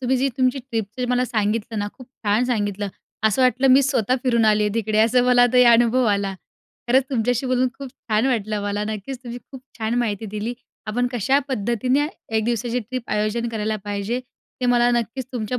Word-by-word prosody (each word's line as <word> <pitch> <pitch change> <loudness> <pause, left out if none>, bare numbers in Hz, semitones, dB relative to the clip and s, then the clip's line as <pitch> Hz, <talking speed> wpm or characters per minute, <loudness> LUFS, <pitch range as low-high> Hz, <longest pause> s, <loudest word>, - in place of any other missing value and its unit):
तुम्ही 260 0 +1
जी 265 +2 +1
तुमची 255 +1 +2
ट्रिपचं 240 -1 -4
मला 250 0 +2
सांगितलं 220 -1 -1
ना, 205 0 -2
खूप 255 - -11
छान 225 -2 0
सांगितलं. 205 -4 -1 0.4
असं 220 +4 +3
वाटलं 255 +1 +3
मी 265 +2 +6
स्वतः 255 -3 +1
फिरून 235 -4 +2
आली 215 -1 +4
आहे 210 0 -1
तिकडे 220 -1 0
असं 235 +3 +4
मला 245 -1 +5
ते 250 0 +6
अनुभव 240 +2 +4
आला. 200 -1 -1 0.5
खरंच 260 +2 +4
तुमच्याशी 245 0 0
बोलून 255 0 +2
खूप 275 -2 -7
छान 225 -3 -1
वाटलं 215 -5 -1
मला. 205 +1 -2
नक्कीच. 215 +5 -5
तुम्ही 240 -1 -7
खूप 265 -2 -10 0.2
छान 220 +1 -1
माहिती 220 -2 -2
दिली. 220 +4 -3 0.3
आपण 245 +4 0
कशा 250 +4 +2
पद्धतीने 250 +4 0 0.3
एक 220 - +1
दिवसाची 240 +1 -1
ट्रिप 250 +2 -5
आयोजन 215 +3 -1
करायला 220 -1 -2
पाहिजे. 205 +4 -2 0.4
ते 250 - 0
मला 245 0 +4
नक्कीच 235 +3 -6
तुमच्या 245 0 -2
235 Hz, 190 wpm, -22 LUFS, 215-255 Hz, 0.5 s, मी